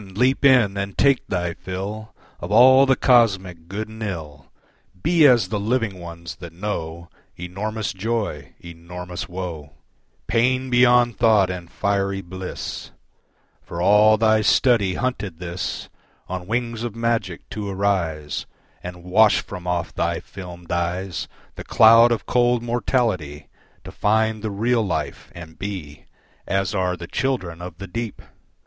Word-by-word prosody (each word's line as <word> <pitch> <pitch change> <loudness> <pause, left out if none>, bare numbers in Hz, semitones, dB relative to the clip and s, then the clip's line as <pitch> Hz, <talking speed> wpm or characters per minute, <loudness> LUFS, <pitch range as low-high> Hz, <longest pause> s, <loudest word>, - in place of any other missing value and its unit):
Leap 130 +6 +2
in 125 -8 +5
and 100 -1 -4
take 140 -2 +3
thy 90 -2 -2
fill 100 +5 -6 0.2
Of 90 - -6
all 130 +5 +7
the 130 - +4
cosmic 95 -11 +2
good 105 +4 -4
and 110 +1 -12
ill, 80 -9 -6 0.5
Be 160 - +5
as 120 -8 +4
the 105 - -1
Living 110 -3 -1
ones 85 -1 -9
that 85 -2 -10
know 85 -3 -5 0.3
Enormous 105 +5 -4
joy, 100 -9 -3
enormous 90 +1 -8
woe, 85 -5 -6 0.5
Pain 130 +3 +1
beyond 120 -1 +4
thought 110 -5 +4
and 90 -2 -7
fiery 100 0 -1
bliss: 95 +1 -6 0.7
For 85 - -8
all 105 +4 +5
thy 110 0 +3
study 105 -4 +3
hunted 105 -9 -3
this, 90 +1 -5 0.4
On 90 -1 -5
wings 115 0 -2
of 120 -2 -4
magic 115 -7 -2
to 105 -2 -4
arise, 90 -7 -1 0.3
And 90 -1 -8
wash 105 +4 +4
from 90 -3 -9
off 90 -1 -2
thy 85 0 -1
filmed 90 -3 -10
eyes 85 0 -2 0.3
The - - -6
cloud 115 +2 +6
of 115 - -1
cold 120 -1 +2
mortality, 110 - -1 0.3
To - - -9
find 110 +1 +1
the 110 - -3
real 115 +4 +1
life 80 -7 -4
and 80 -1 -11
be 90 -8 -6 0.4
As 95 0 0
are 90 -2 0
the 85 - -7
children 90 -6 -2
of 90 +1 -8
the 95 - -7
deep! 115 +3 -5
100 Hz, 140 wpm, -22 LUFS, 90-115 Hz, 0.7 s, all